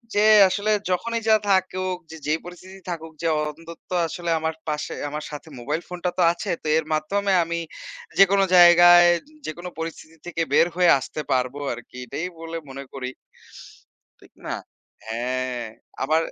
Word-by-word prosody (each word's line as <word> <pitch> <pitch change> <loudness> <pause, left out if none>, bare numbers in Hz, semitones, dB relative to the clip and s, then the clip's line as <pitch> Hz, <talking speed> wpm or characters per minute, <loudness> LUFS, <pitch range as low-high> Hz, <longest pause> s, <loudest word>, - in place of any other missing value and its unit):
যে 205 +1 +4 0.2
আসলে 205 +3 0 0.2
যখনই 230 +5 -1
যা 220 - +7
থাকুক 185 -1 +1
যে, 160 - -8
যেই 155 +2 +1
পরিস্থিতি 185 +2 -11
থাকুক, 160 -2 -5
যে 165 - 0 0.2
অন্তত্ব 165 +2 -14 0.2
আসলে 170 +1 -5
আমার 160 0 -2
পাশে 150 0 -3 0.2
আমার 150 +1 -5
সাথে 150 +2 -8
মোবাইল 150 +7 -2
ফোনটা 180 0 -3
তো - - +2
আছে 175 - -6
তো - - -5
এর 160 - -1
মাধ্যমে 195 +6 0
আমি 170 0 -3 0.6
যেকোনো 195 0 +6
জায়গায় 175 0 +8 0.4
যেকোন 170 +3 -7
পরিস্থিতি 165 0 -7
থেকে 170 -1 -3
বের 165 - +5
হয়ে 180 -1 +5
আসতে 155 - -6
পারবো 130 +2 -1
আরকি। 120 +1 -11
এটাই 160 +8 -4
বলে 165 0 -6
মনে 135 +1 -7
করি। 130 -2 -4 1.1
ঠিক - - -20
না? - - -2 0.5
হ্যাঁ, 125 +1 -2 0.4
আবার 155 +4 +2
165 Hz, 155 wpm, -23 LUFS, 150-180 Hz, 1.1 s, জায়গায়